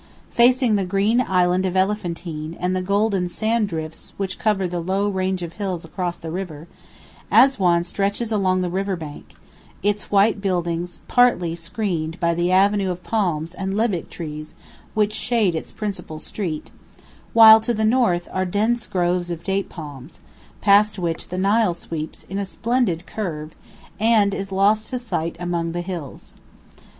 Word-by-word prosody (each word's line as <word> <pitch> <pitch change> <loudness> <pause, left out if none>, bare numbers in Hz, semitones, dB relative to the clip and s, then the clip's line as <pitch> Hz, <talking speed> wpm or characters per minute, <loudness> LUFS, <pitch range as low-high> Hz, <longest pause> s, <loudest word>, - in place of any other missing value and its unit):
Facing 245 -2 +4
the 195 - 0
green 200 +6 +2
island 180 -4 +2
of 190 0 -1
Elephantine 170 -5 -2
and 180 +1 0
the 185 - 0
golden 200 -1 +1
sand 220 +4 0
drifts 160 -2 -6
which 190 -2 -3
cover 205 -4 +1
the 175 0 -3
low 190 +4 0
range 190 -2 -1
of 170 -1 -6
hills 185 -5 -4
across 175 +1 -3
the 165 - -7
river, 170 -3 -6 0.6
Assuan 185 -11 +5
stretches 200 +5 -1
along 185 -3 +2
the 180 - -1
river 195 +1 -1
bank, 155 -4 -10 0.5
its 205 +1 0
white 205 +1 +3
buildings 175 -2 -2
partly 240 -9 +3
screened 165 -1 -3
by 170 -1 +2
the 175 +1 0
avenue 195 +1 +3
of 180 0 -4
palms 170 -7 -1
and 190 +1 -3
lebbek 215 -6 0
trees 155 -2 -7 0.4
which 210 -1 +2
shade 220 -5 +1
its 160 - -4
principal 190 -7 -5
street, 160 -1 -5 0.6
while 220 -1 +10
to 225 +2 -2
the 220 -1 0
north 215 -7 +2
are 185 - 0
dense 215 +6 0
groves 175 -1 0
of 170 -1 -5
date 195 +2 -1
palms, 145 -6 -10 0.4
past 205 +1 +4
which 170 -3 -3
the 180 - -4
Nile 200 0 +2
sweeps 160 -2 -6
in 195 +2 -5
a - - -1
splendid 220 -5 -1
curve 160 -8 -5 0.5
and 215 -2 +4
is 195 0 -4
lost 205 +3 +2
to 255 - -2
sight 195 -9 -3
among 170 -1 -2
the 175 - -2
hills. 175 -6 -7
185 Hz, 160 wpm, -22 LUFS, 170-210 Hz, 0.6 s, while